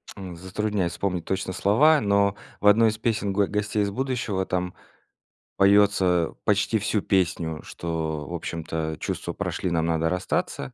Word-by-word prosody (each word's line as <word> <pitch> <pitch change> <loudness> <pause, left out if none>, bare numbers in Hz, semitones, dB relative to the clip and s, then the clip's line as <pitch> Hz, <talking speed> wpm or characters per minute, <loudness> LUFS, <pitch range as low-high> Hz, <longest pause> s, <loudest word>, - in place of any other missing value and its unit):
затрудняюсь 95 +1 -3
вспомнить 90 -4 -2
точно 95 0 -2
слова, 145 - +4
но 100 -1 +2 0.2
в 105 - +1
одной 110 +2 +6
из 110 - -4
песен 110 -3 -1
"Го 100 +1 +3
Гостей 105 0 -1
из 100 - -2
будущего" 120 -5 -2
там 90 -1 -2 0.8
поётся 95 -4 +3
почти 105 +1 +2
всю 105 0 0
песню, 85 -5 0
что 80 -3 -4
в - - -7
общем-то 80 -2 -4
чувства - - -4
прошли, 90 - -3
нам 80 -1 +1
надо 80 0 +1
расстаться. 125 - -2
95 Hz, 145 wpm, -25 LUFS, 85-105 Hz, 0.8 s, одной